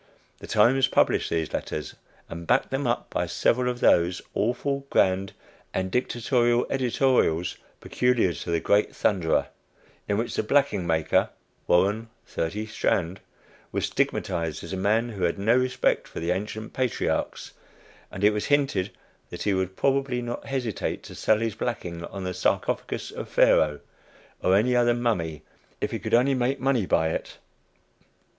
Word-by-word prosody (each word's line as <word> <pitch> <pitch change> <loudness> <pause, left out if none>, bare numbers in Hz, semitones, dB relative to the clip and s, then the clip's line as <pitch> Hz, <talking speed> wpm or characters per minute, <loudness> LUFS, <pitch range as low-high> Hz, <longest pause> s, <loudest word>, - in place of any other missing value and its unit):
The - - -10
Times 125 +5 +4
published - - +2
these 80 -2 -2
letters, 75 -4 -4 0.3
and 85 0 -8
backed 125 +2 +2
them 135 0 -1
up 120 - -1
by - - -1
several 125 +1 +1
of 125 0 -4
those 85 +1 +4
awful, 140 +3 -1
grand 95 +1 +2 0.4
and 95 0 -1
dictatorial 120 0 +1
editorials 125 - +1 0.2
peculiar 125 -8 +1
to 75 - -7
the 85 -1 +1
great 100 +4 +2
"Thunderer," 90 -6 +1 0.6
in 100 - 0
which 115 +2 -2
the - - 0
blacking 110 -7 +1
maker, 80 -2 +2 0.4
"Warren, 105 +6 +2 0.2
30 100 +7 -3
Strand," 95 -4 -1 0.5
was - - -1
stigmatized 85 -4 -1
as 85 - -7
a - - -1
man 110 +5 +1
who 100 -5 -7
had 85 - 0
no 110 +4 +3
respect 130 0 +1
for - - -7
the 85 +1 -1
ancient 105 +4 -4
patriarchs, 130 -2 -2 0.6
and 95 - -6
it 105 - +6
was 105 - -2
hinted 135 -10 +1 0.4
that 85 - -6
he 100 - +1
would 95 0 -1
probably 135 -1 +1
not 120 0 -5
hesitate 120 -8 -3
to - - -10
sell 110 - +2
his 115 0 -2
blacking 90 -7 -4
on 95 +1 -7
the 90 0 -3
sarcophagus - - -1
of - - -7
Pharaoh, 75 -2 +4 0.6
"or 95 - +3
any 120 +5 +3
other" 120 -1 +3
mummy, 90 -11 -1 0.4
if - - -2
he - - -3
could - - +1
only 130 +3 +3
make 130 +2 0
money 125 -7 +1
by 80 0 +2
it. - - -5
110 Hz, 160 wpm, -26 LUFS, 90-125 Hz, 0.6 s, it